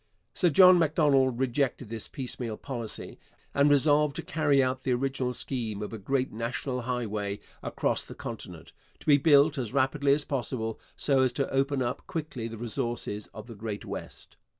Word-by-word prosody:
Sir 180 Hz, -, +3 dB
John 180 Hz, +3 st, +8 dB
Macdonald 145 Hz, -6 st, +3 dB
rejected 130 Hz, -1 st, -1 dB
this 115 Hz, -1 st, -3 dB
piecemeal 120 Hz, -4 st, -4 dB
policy, 120 Hz, -5 st, -6 dB, 0.3 s
and 140 Hz, +1 st, +4 dB
resolved 145 Hz, 0 st, +4 dB
to -, -, -4 dB
carry 145 Hz, -3 st, +2 dB
out 130 Hz, 0 st, -1 dB
the 130 Hz, -, 0 dB
original 130 Hz, 0 st, -1 dB
scheme 115 Hz, -5 st, -3 dB
of 105 Hz, -, -6 dB
a 110 Hz, -, -5 dB
great 130 Hz, +5 st, -1 dB
national 125 Hz, +3 st, -3 dB
highway 110 Hz, -5 st, -3 dB, 0.2 s
across -, -, 0 dB
the -, -, -10 dB
continent, -, -, -8 dB, 0.3 s
to -, -, -17 dB
be 145 Hz, -1 st, +6 dB
built 145 Hz, -1 st, +5 dB
as 120 Hz, -2 st, -4 dB
rapidly 140 Hz, +1 st, +2 dB
as 145 Hz, +1 st, +2 dB
possible 120 Hz, -4 st, -3 dB, 0.2 s
so 135 Hz, -2 st, +2 dB
as 130 Hz, -1 st, +3 dB
to 135 Hz, +2 st, -1 dB
open 135 Hz, 0 st, +1 dB
up 120 Hz, +1 st, -4 dB
quickly 145 Hz, -8 st, -4 dB
the 115 Hz, 0 st, -8 dB
resources 115 Hz, -2 st, -3 dB
of 110 Hz, 0 st, -10 dB
the 120 Hz, -, -9 dB
Great 105 Hz, -1 st, -6 dB
West. -, -, -8 dB
130 Hz, 175 wpm, -28 LUFS, 115-140 Hz, 0.3 s, John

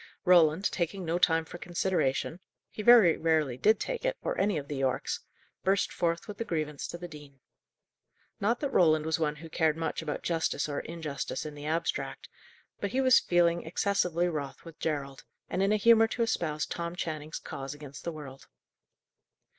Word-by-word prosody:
Roland, 175 Hz, 0 st, +5 dB
taking 180 Hz, +1 st, -2 dB
no 165 Hz, +2 st, 0 dB
time 165 Hz, -2 st, +3 dB
for 175 Hz, -, -10 dB
consideration 175 Hz, -3 st, -1 dB, 0.3 s
he -, -, -6 dB
very 215 Hz, -7 st, +7 dB
rarely 155 Hz, -5 st, +1 dB
did 210 Hz, -, +3 dB
take -, -, -3 dB
it, -, -, 0 dB
or -, -, -1 dB
any 200 Hz, -3 st, +1 dB
of 140 Hz, -1 st, -5 dB
the 145 Hz, -, -4 dB
Yorkes 135 Hz, -1 st, -1 dB, 0.4 s
burst 195 Hz, +1 st, +1 dB
forth 170 Hz, +1 st, -1 dB
with 210 Hz, -1 st, -8 dB
the -, -, 0 dB
grievance 155 Hz, -7 st, -3 dB
to -, -, -6 dB
the 175 Hz, 0 st, -7 dB
dean. 145 Hz, -4 st, -13 dB, 1.0 s
Not 230 Hz, +4 st, +1 dB
that 285 Hz, -2 st, -1 dB
Roland 155 Hz, -6 st, +4 dB
was 160 Hz, +1 st, 0 dB
one 150 Hz, -2 st, 0 dB
who 160 Hz, +2 st, -10 dB
cared 160 Hz, -1 st, +1 dB
much 165 Hz, 0 st, -2 dB
about 150 Hz, -2 st, -4 dB
justice 165 Hz, -4 st, 0 dB
or 145 Hz, -1 st, -2 dB
injustice 155 Hz, -5 st, -5 dB
in 150 Hz, -, -6 dB
the 145 Hz, 0 st, -7 dB
abstract; 165 Hz, +2 st, -2 dB, 0.5 s
but 200 Hz, -, -2 dB
he 260 Hz, -, +1 dB
was 260 Hz, -2 st, +6 dB
feeling 170 Hz, -1 st, +2 dB
excessively 175 Hz, 0 st, 0 dB
wroth 145 Hz, -4 st, -5 dB
with 165 Hz, -2 st, -12 dB
Gerald, 140 Hz, -4 st, -3 dB, 0.3 s
and 185 Hz, -, 0 dB
in 195 Hz, +1 st, +3 dB
a 215 Hz, -, +4 dB
humour 225 Hz, +1 st, +6 dB
to 235 Hz, +1 st, -1 dB
espouse 155 Hz, -9 st, -1 dB
Tom 170 Hz, 0 st, -4 dB
Channing's 155 Hz, -3 st, -4 dB
cause 135 Hz, +1 st, -6 dB
against 145 Hz, -2 st, -10 dB
the 170 Hz, -, -3 dB
world. 140 Hz, -4 st, -10 dB
165 Hz, 185 wpm, -29 LUFS, 150-185 Hz, 1.0 s, very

